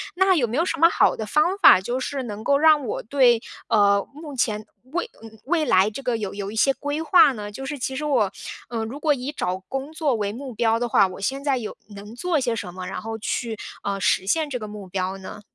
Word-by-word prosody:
那 380 Hz, 0 st, +4 dB
有 270 Hz, -, +2 dB
没 230 Hz, -, -4 dB
有 330 Hz, -, +3 dB
什 -, -, -2 dB
么 335 Hz, -, +7 dB
好 -, -, +3 dB
的 220 Hz, -, -4 dB
方 305 Hz, -, +1 dB
法， 290 Hz, -, +7 dB
就 245 Hz, +6 st, -2 dB
是 275 Hz, +1 st, -3 dB
能 215 Hz, -2 st, -7 dB
够 280 Hz, +3 st, +3 dB
让 305 Hz, -3 st, +5 dB
我 -, -, -3 dB
对， 240 Hz, -2 st, +3 dB, 0.3 s
呃， 200 Hz, -2 st, +3 dB
目 300 Hz, 0 st, -9 dB
前 215 Hz, -4 st, -1 dB, 0.3 s
未 350 Hz, +7 st, -2 dB, 0.4 s
未 320 Hz, +2 st, +1 dB
来 190 Hz, -5 st, +4 dB
这 215 Hz, +6 st, -7 dB
个 250 Hz, -3 st, -1 dB
有 205 Hz, -3 st, -4 dB
有 200 Hz, 0 st, -5 dB
一 -, -, -8 dB
些 270 Hz, +5 st, +3 dB
规 290 Hz, +2 st, -3 dB
划 325 Hz, -3 st, +6 dB
呢？ 205 Hz, -3 st, -7 dB
就 270 Hz, +6 st, -7 dB
是 290 Hz, +2 st, -4 dB
其 265 Hz, +1 st, -3 dB
实 300 Hz, -, -3 dB
我， 240 Hz, -10 st, +2 dB, 0.4 s
呃， 225 Hz, -2 st, -3 dB
如 265 Hz, +6 st, -7 dB
果 305 Hz, -2 st, +3 dB
以 275 Hz, +2 st, -5 dB
找 185 Hz, -9 st, -2 dB
工 270 Hz, +2 st, -4 dB
作 310 Hz, -5 st, 0 dB
为 205 Hz, -2 st, -2 dB
目 255 Hz, +3 st, -7 dB
标 225 Hz, 0 st, +1 dB
的 240 Hz, -, -1 dB
话， 200 Hz, -, +4 dB
我 185 Hz, -, -9 dB
现 270 Hz, +8 st, -2 dB
在 280 Hz, -2 st, +1 dB
有 225 Hz, -4 st, -6 dB, 0.2 s
能 205 Hz, +3 st, -10 dB
做 335 Hz, +4 st, 0 dB
些 240 Hz, -3 st, -1 dB
什 180 Hz, -5 st, -6 dB
么？ 185 Hz, 0 st, -7 dB
然 -, -, -5 dB
后 225 Hz, 0 st, -5 dB
去， 225 Hz, +1 st, -3 dB, 0.3 s
呃， 200 Hz, -1 st, -2 dB
实 185 Hz, -1 st, +2 dB
现 310 Hz, +8 st, +1 dB
这 255 Hz, -, -3 dB
个 215 Hz, -3 st, -7 dB
目 205 Hz, -2 st, -9 dB
标 185 Hz, +1 st, -3 dB
呢？ 190 Hz, +2 st, -9 dB
240 Hz, 265 characters per minute, -23 LUFS, 210-290 Hz, 0.4 s, 么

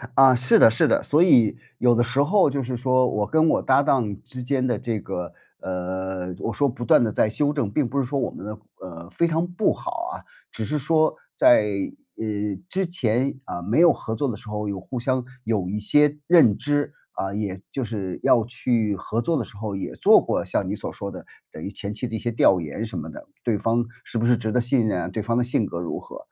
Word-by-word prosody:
啊， 135 Hz, -1 st, +7 dB
是 125 Hz, +1 st, +5 dB
的 -, -, +8 dB
是 115 Hz, -, +3 dB
的。 -, -, +2 dB
所 155 Hz, +4 st, +3 dB
以 120 Hz, -, +5 dB, 0.2 s
有 120 Hz, -1 st, +4 dB
的 120 Hz, -, +3 dB
时 125 Hz, +4 st, 0 dB
候 185 Hz, +3 st, +4 dB
就 140 Hz, -1 st, -2 dB
是 125 Hz, +1 st, -3 dB
说 130 Hz, +1 st, +2 dB
我 105 Hz, 0 st, -1 dB
跟 160 Hz, 0 st, +3 dB
我 -, -, +2 dB
搭 135 Hz, +1 st, +3 dB
档 115 Hz, -9 st, 0 dB
之 130 Hz, -1 st, -8 dB
间 130 Hz, 0 st, 0 dB
的 120 Hz, -3 st, 0 dB
这 115 Hz, -3 st, -2 dB
个， 90 Hz, -2 st, -5 dB, 0.3 s
呃 95 Hz, 0 st, -4 dB
我 -, -, -3 dB
说 145 Hz, -, +2 dB
不 120 Hz, 0 st, -7 dB
断 120 Hz, -, +5 dB
地 110 Hz, -, 0 dB
在 105 Hz, -, +2 dB
修 145 Hz, +6 st, 0 dB
正， 120 Hz, -9 st, -2 dB
并 135 Hz, +3 st, +1 dB
不 140 Hz, +4 st, -2 dB
是 135 Hz, -, 0 dB
说 140 Hz, +3 st, -2 dB
我 125 Hz, -, -1 dB
们 100 Hz, -, -10 dB
的， 105 Hz, +1 st, -6 dB, 0.2 s
呃， 85 Hz, -1 st, -9 dB
非 170 Hz, -, +1 dB
常 165 Hz, +1 st, 0 dB
不 180 Hz, +4 st, +1 dB
好 -, -, -6 dB, 0.2 s
啊。 -, -, -9 dB, 0.3 s
只 110 Hz, -, -4 dB
是 150 Hz, -, -1 dB
说 155 Hz, +2 st, +2 dB, 0.2 s
在， 110 Hz, -3 st, +5 dB, 0.5 s
呃， 110 Hz, -, -4 dB, 0.4 s
之 190 Hz, 0 st, 0 dB
前 135 Hz, -6 st, -1 dB
啊， 90 Hz, -, -5 dB
没 105 Hz, -, 0 dB
有 175 Hz, 0 st, +7 dB
合 110 Hz, -, -5 dB
作 140 Hz, +4 st, -1 dB
的 115 Hz, -, -3 dB
时 110 Hz, +1 st, -12 dB
候 105 Hz, 0 st, -3 dB
有 100 Hz, -1 st, -4 dB
互 125 Hz, +7 st, -6 dB
相 130 Hz, +1 st, 0 dB, 0.2 s
有 110 Hz, -6 st, -1 dB
一 105 Hz, +2 st, -2 dB
些 150 Hz, +7 st, +3 dB
认 160 Hz, -, +6 dB
知， 145 Hz, 0 st, -1 dB, 0.2 s
啊， 95 Hz, 0 st, -3 dB
也 100 Hz, -3 st, -3 dB
就 135 Hz, -, -3 dB
是 100 Hz, -5 st, -5 dB
要 115 Hz, -, +4 dB
去 115 Hz, -4 st, 0 dB
合 105 Hz, +4 st, -3 dB
作 165 Hz, +8 st, 0 dB
的 125 Hz, -, -1 dB
时 100 Hz, -, -13 dB
候 105 Hz, -1 st, -4 dB
也 95 Hz, -, -4 dB
做 -, -, +5 dB
过 -, -, -1 dB
像 -, -, -1 dB
你 -, -, -2 dB
所 -, -, -5 dB
说 -, -, -6 dB
的 -, -, -10 dB, 0.3 s
等 80 Hz, -, -9 dB
于 -, -, -4 dB
前 100 Hz, 0 st, -6 dB
期 115 Hz, +4 st, -4 dB
的 115 Hz, -, -5 dB
一 -, -, -3 dB
些 120 Hz, -, -2 dB
调 95 Hz, -4 st, +4 dB
研 80 Hz, +8 st, -5 dB
什 115 Hz, -, -6 dB
么 -, -, -7 dB
的。 300 Hz, +1 st, -11 dB, 0.2 s
对 115 Hz, -4 st, +1 dB
方 115 Hz, +3 st, +1 dB, 0.2 s
是 -, -, -6 dB
不 115 Hz, -, 0 dB
是 120 Hz, -1 st, +4 dB
值 110 Hz, -2 st, -3 dB
得 125 Hz, -, +2 dB
信 120 Hz, -1 st, +1 dB
任 90 Hz, -4 st, 0 dB
啊？ -, -, -3 dB
对 110 Hz, -, -4 dB
方 115 Hz, +1 st, -1 dB
的 125 Hz, -, +2 dB
性 120 Hz, -3 st, 0 dB
格 85 Hz, -, -5 dB
如 85 Hz, -, -4 dB
何 -, -, -11 dB
120 Hz, 265 characters per minute, -23 LUFS, 105-135 Hz, 0.5 s, 的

